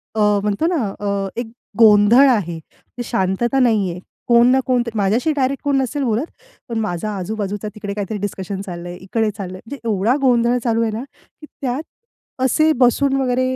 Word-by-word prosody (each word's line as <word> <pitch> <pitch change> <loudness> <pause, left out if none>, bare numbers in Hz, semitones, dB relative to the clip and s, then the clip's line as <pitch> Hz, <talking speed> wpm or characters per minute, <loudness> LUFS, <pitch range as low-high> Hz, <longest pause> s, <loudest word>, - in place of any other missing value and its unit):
अ, - - -1 0.2
म्हणतो 210 +9 0
ना 340 -5 0 0.2
अ, 200 -1 -1
एक 240 - -6 0.3
गोंधळ 220 +4 +7
आहे 175 -9 0 0.4
ते 245 - -3
शांतता 230 +3 0
नाही 220 -7 +2
आहे, 175 - -7 0.3
कोण 235 0 +6
ना 265 - +4
कोण 250 -2 +2
तर - - -3
माझ्याशी 215 +8 +1
डायरेक्ट 275 -1 -1
कोण 285 -2 +1
नसेल 280 +2 -2
बोलत 235 +2 0 0.4
पण 230 - -3
माझा 215 -1 -2
आजूबाजूचा 205 +2 -4
तिकडे 205 -2 -5
काहीतरी 205 +1 -3
डिस्कशन 195 -1 -4
चाललं 175 -3 -7
आहे, 175 - -7
इकडे 215 +4 -1
चाललंय. 185 -2 -6
म्हणजे 280 +4 -8
एवढा 215 +4 +2
गोंधळ 245 -2 +3
चालू 230 -1 +1
आहे 225 - 0
ना, 220 +3 -4
की 280 +2 -18 0.2
त्यात 265 +2 -2 0.6
असे 310 +5 +3
बसून 270 +3 +2
वगैरे 255 0 0
225 Hz, 180 wpm, -19 LUFS, 200-255 Hz, 0.6 s, गोंधळ